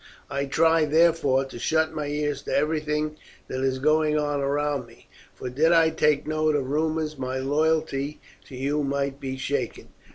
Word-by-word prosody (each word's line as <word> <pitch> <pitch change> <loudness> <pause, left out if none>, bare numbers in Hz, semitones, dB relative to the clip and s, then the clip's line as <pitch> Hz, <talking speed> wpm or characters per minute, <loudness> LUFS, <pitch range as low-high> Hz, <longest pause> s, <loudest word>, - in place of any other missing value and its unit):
I 140 +1 -1
try, 160 +3 +3
therefore, 155 -4 +3
to 130 -3 -9
shut 160 +4 +1
my 150 -2 -3
ears 145 -1 -2
to - - -1
everything 150 0 -1 0.3
that 130 - -4
is 130 0 0
going 155 +2 +2
on 145 -1 0
around 140 -2 -1
me, 115 0 -19 0.3
for - - -6
did 150 +7 +2
I 165 -1 +5
take 150 -2 +2
note 155 0 +1
of 135 -2 -1
rumours 155 -1 -1
my 130 0 -3
loyalty 150 +1 0 0.3
to 130 - -11
you 140 +3 -1
might 140 0 -2
be 130 -2 -4
shaken." 135 -2 -3
145 Hz, 170 wpm, -25 LUFS, 135-155 Hz, 0.3 s, I